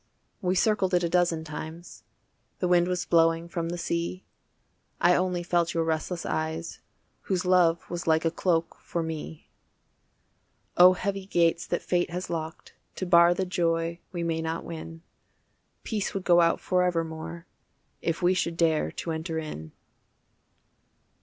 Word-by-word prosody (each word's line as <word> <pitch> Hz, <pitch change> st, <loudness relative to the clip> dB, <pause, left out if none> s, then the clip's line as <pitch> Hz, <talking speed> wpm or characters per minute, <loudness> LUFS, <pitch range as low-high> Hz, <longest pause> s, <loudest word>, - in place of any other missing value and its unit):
We 185 Hz, 0 st, 0 dB
circled 190 Hz, -2 st, +2 dB
it 175 Hz, -, +2 dB
a 170 Hz, -, 0 dB
dozen 175 Hz, -2 st, +1 dB
times, 160 Hz, +2 st, -8 dB, 0.6 s
The 180 Hz, -, -1 dB
wind 175 Hz, 0 st, +4 dB
was 180 Hz, -1 st, -1 dB
blowing 165 Hz, 0 st, +3 dB
from 170 Hz, -1 st, -3 dB
the 175 Hz, -, -3 dB
sea, 170 Hz, +2 st, -3 dB, 0.7 s
I 175 Hz, -, +5 dB
only 180 Hz, -1 st, 0 dB
felt 170 Hz, -1 st, 0 dB
your 165 Hz, -, +2 dB
restless 160 Hz, +2 st, -2 dB
eyes 160 Hz, +1 st, -3 dB, 0.5 s
Whose 185 Hz, -2 st, 0 dB
love 175 Hz, -2 st, +3 dB
was 175 Hz, 0 st, -5 dB
like 160 Hz, 0 st, +3 dB
a 165 Hz, -, +2 dB
cloak 165 Hz, -1 st, 0 dB
for 170 Hz, -, -3 dB
me. 160 Hz, -1 st, -7 dB, 1.2 s
Oh 180 Hz, +1 st, +8 dB
heavy 195 Hz, +1 st, -3 dB
gates 170 Hz, -2 st, +2 dB
that 175 Hz, -, -2 dB
fate 175 Hz, -1 st, 0 dB
has 180 Hz, +2 st, -5 dB
locked 160 Hz, -1 st, -5 dB, 0.2 s
To 185 Hz, -, -3 dB
bar 170 Hz, -1 st, +6 dB
the 190 Hz, -, -1 dB
joy 170 Hz, -1 st, -1 dB
we 175 Hz, -2 st, -3 dB
may 165 Hz, -1 st, -1 dB
not 160 Hz, +1 st, -3 dB
win, 165 Hz, 0 st, -8 dB, 0.8 s
Peace 210 Hz, -4 st, -3 dB
would 195 Hz, -, -2 dB
go 175 Hz, -1 st, +5 dB
out 165 Hz, 0 st, +3 dB
forevermore 170 Hz, -2 st, -1 dB, 0.6 s
If 170 Hz, +2 st, -2 dB
we 180 Hz, +1 st, +4 dB
should 170 Hz, -2 st, -1 dB
dare 160 Hz, -2 st, +2 dB
to 165 Hz, -, -4 dB
enter 160 Hz, +1 st, -3 dB
in. 80 Hz, -, -6 dB
170 Hz, 155 wpm, -27 LUFS, 165-180 Hz, 1.2 s, Oh